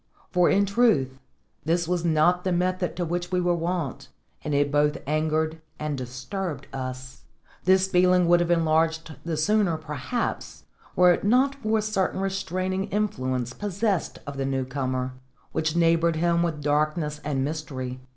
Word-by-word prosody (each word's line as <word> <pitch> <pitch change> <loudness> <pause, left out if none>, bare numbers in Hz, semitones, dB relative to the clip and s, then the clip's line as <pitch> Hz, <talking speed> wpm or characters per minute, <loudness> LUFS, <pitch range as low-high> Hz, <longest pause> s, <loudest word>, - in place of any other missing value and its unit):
For, 180 -1 +4
in 200 +1 +3
truth, 195 - +2 0.4
this 170 +2 0
was 175 -1 0
not 170 +2 +3
the 185 - 0
method 180 +1 0
to 175 - -2
which 175 +2 -3
we 180 - +2
were 175 0 +2
wont, 170 -4 -3 0.4
and 150 - -3
it 145 0 +2
both 150 0 +2
angered 155 +2 0 0.2
and 150 -1 -3
disturbed 135 +5 -5
us. 130 -1 -6 0.4
This 190 +1 +5
feeling 180 -1 +3
would 175 0 +5
have 175 0 0
enlarged 160 -1 +1
the 165 -2 -2
sooner, 195 0 +2
perhaps, 155 - -4 0.3
were 180 -1 +6
it - - -3
not 255 +6 +3
for 220 -1 +1
a 215 - 0
certain 210 -3 0
restraining 190 0 -2
influence 130 - -2
possessed 200 - -1
of 140 -1 -7
the 135 - -1
new 135 -1 -1
comer, 130 -1 -2 0.4
which 160 0 -1
neighboured 165 0 +3
him 170 +1 +2
with 160 -4 -2
darkness 150 +1 0
and 135 -3 -1
mystery. 135 -4 -5
165 Hz, 160 wpm, -25 LUFS, 145-185 Hz, 0.4 s, were